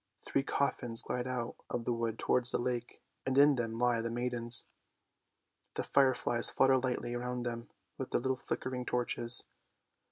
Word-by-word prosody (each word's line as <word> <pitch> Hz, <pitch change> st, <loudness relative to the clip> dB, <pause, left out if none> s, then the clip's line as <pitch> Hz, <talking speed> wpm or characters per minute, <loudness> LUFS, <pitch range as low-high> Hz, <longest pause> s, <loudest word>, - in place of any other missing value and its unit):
Three 135 Hz, -, 0 dB
coffins 125 Hz, -4 st, +1 dB
glide 125 Hz, 0 st, -3 dB
out 125 Hz, -2 st, -4 dB
of 120 Hz, -1 st, -4 dB
the 120 Hz, -, 0 dB
wood 115 Hz, -1 st, -3 dB
towards 125 Hz, 0 st, +2 dB
the -, -, +1 dB
lake, 120 Hz, -1 st, -4 dB, 0.2 s
and 130 Hz, 0 st, -1 dB
in 145 Hz, +1 st, +6 dB
them 115 Hz, -3 st, -3 dB
lie 120 Hz, -1 st, +1 dB
the 115 Hz, -, -3 dB
maidens. 120 Hz, 0 st, +1 dB, 1.1 s
The -, -, -2 dB
fire 135 Hz, -2 st, +3 dB
flies 120 Hz, -1 st, +4 dB
flutter 135 Hz, 0 st, +3 dB
lightly 125 Hz, -1 st, -3 dB
round 125 Hz, 0 st, -4 dB
them 115 Hz, -1 st, -5 dB, 0.3 s
with -, -, -4 dB
their -, -, 0 dB
little 130 Hz, +1 st, 0 dB
flickering 130 Hz, 0 st, -4 dB
torches. 120 Hz, -1 st, +2 dB
120 Hz, 165 wpm, -32 LUFS, 120-130 Hz, 1.1 s, in